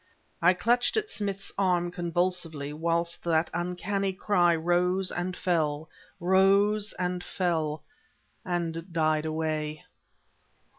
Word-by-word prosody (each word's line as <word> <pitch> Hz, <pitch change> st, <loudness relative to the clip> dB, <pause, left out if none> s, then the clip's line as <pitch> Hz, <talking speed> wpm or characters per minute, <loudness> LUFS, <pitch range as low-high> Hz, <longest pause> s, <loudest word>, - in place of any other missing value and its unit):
I 180 Hz, +2 st, +5 dB
clutched 240 Hz, -, +2 dB
at 430 Hz, -1 st, -1 dB
Smith's 200 Hz, -2 st, -3 dB
arm 175 Hz, -2 st, +2 dB
convulsively 175 Hz, -4 st, -1 dB
whilst 170 Hz, +2 st, -1 dB
that 165 Hz, -1 st, +1 dB
uncanny 190 Hz, +3 st, -1 dB
cry 180 Hz, -3 st, +3 dB
rose 180 Hz, +3 st, +1 dB
and 180 Hz, +1 st, -3 dB
fell 155 Hz, -3 st, 0 dB, 0.3 s
rose 200 Hz, +3 st, +3 dB
and 180 Hz, 0 st, -2 dB
fell 160 Hz, -5 st, -1 dB, 0.6 s
and 170 Hz, -1 st, -3 dB
died 155 Hz, -1 st, +1 dB
away. 155 Hz, -1 st, -2 dB
175 Hz, 105 wpm, -28 LUFS, 160-190 Hz, 0.6 s, I